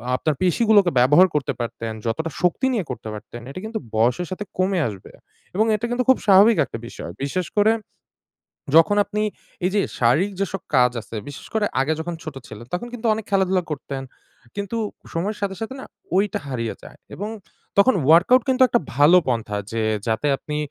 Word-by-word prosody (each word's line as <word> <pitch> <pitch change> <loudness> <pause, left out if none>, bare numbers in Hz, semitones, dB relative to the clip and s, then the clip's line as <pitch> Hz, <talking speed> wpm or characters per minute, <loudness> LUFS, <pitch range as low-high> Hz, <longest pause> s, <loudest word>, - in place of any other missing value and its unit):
আপনার 150 +3 0
পেশিগুলোকে 200 0 +4
ব্যবহার 150 +9 +6
করতে 145 -1 0
পারতেন, 115 -1 -4
যতটা 160 +9 -1
শক্তি 180 +8 +1
নিয়ে 210 -7 -1
করতে 120 -3 -6
পারতেন 110 +3 -9
এটা 140 - -7
কিন্তু 220 0 -4 0.2
বয়সের 125 +10 +2
সাথে 185 +2 -4
কমে 185 0 +1
আসবে। 100 -4 -9 0.4
এবং 215 +3 +3
এটা 215 +3 -3
কিন্তু 245 +1 0
খুব 260 - +7
স্বাভাবিক 205 +3 +6
একটা - - -7
বিষয়। 85 - -8
বিশেষ 180 +4 -2
করে 210 +2 +5 1.0
যখন 165 +5 +6
আপনি 210 +1 -3 0.4
এই 185 - +1
যে 205 - +4 0.2
শারীরিক 150 +12 +3
যেসব 195 -1 -2
কাজ 125 -1 +5
আছে 115 - -10
বিশেষ 145 - -10
করে 220 -2 +1 0.2
আগে 145 +4 +1
যখন 170 +1 -4
ছোট 155 - -7
ছিলেন 110 +2 -10
তখন 180 +7 -2
কিন্তু 240 -1 -3
অনেক 215 -1 -5
খেলাধুলা 190 -2 +2
করতেন 140 -2 -5 0.5
কিন্তু 200 +3 -3 0.4
সময়ের 200 +6 -2
সাথে, 195 -1 -2
সাথে 225 +4 -4
না - - -8 0.3
ঐটা 200 +1 +1
হারিয়ে 115 -4 -3
যায় - - -12 0.2
এবং 205 +3 -4 0.5
তখন 230 +6 +6 0.2
workout 190 +10 +6
কিন্তু 260 0 +1
একটা 240 - +2 0.2
ভালো 145 +6 +6
পন্থা 115 -4 -1
যে 115 0 -1 0.3
যাতে 115 +6 0
আপনি 150 +2 -5
180 Hz, 180 wpm, -22 LUFS, 130-205 Hz, 1.0 s, খুব